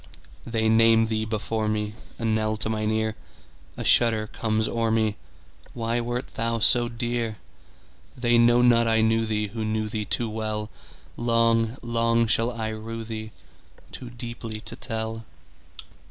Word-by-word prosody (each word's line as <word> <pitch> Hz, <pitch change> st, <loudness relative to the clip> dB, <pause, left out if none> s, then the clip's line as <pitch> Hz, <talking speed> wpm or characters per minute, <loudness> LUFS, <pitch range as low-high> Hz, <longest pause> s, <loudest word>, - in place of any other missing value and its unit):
They 110 Hz, -1 st, 0 dB
name 115 Hz, 0 st, +5 dB
thee 110 Hz, -1 st, -1 dB
before 110 Hz, 0 st, -2 dB
me,A 105 Hz, +2 st, -4 dB
knell 110 Hz, -1 st, +1 dB
to 110 Hz, -, -1 dB
mine 110 Hz, -1 st, -1 dB
ear;A 110 Hz, 0 st, -5 dB
shudder 115 Hz, -2 st, +3 dB
comes 110 Hz, 0 st, -1 dB
o'er 115 Hz, -1 st, 0 dB
me—Why 115 Hz, +1 st, -3 dB
wert 120 Hz, +2 st, -4 dB
thou 115 Hz, 0 st, -1 dB
so 120 Hz, +2 st, +4 dB
dear? 120 Hz, -2 st, -2 dB, 0.8 s
They 120 Hz, -1 st, +3 dB
know 120 Hz, +1 st, +5 dB
not 115 Hz, -1 st, +5 dB
I 110 Hz, 0 st, +3 dB
knew 110 Hz, 0 st, +2 dB
theeWho 105 Hz, 0 st, -2 dB
knew 110 Hz, 0 st, -1 dB
thee 105 Hz, -1 st, -3 dB
too 120 Hz, +3 st, -1 dB
well:Long, 115 Hz, +2 st, -1 dB
long 115 Hz, 0 st, +2 dB
shall 115 Hz, +1 st, +1 dB
I 110 Hz, -2 st, -3 dB
rue 115 Hz, +1 st, -6 dB
theeToo 110 Hz, +2 st, -11 dB
deeply 115 Hz, -2 st, -6 dB
to -, -, -7 dB
tell. 110 Hz, -1 st, -4 dB
115 Hz, 130 wpm, -25 LUFS, 110-115 Hz, 0.8 s, name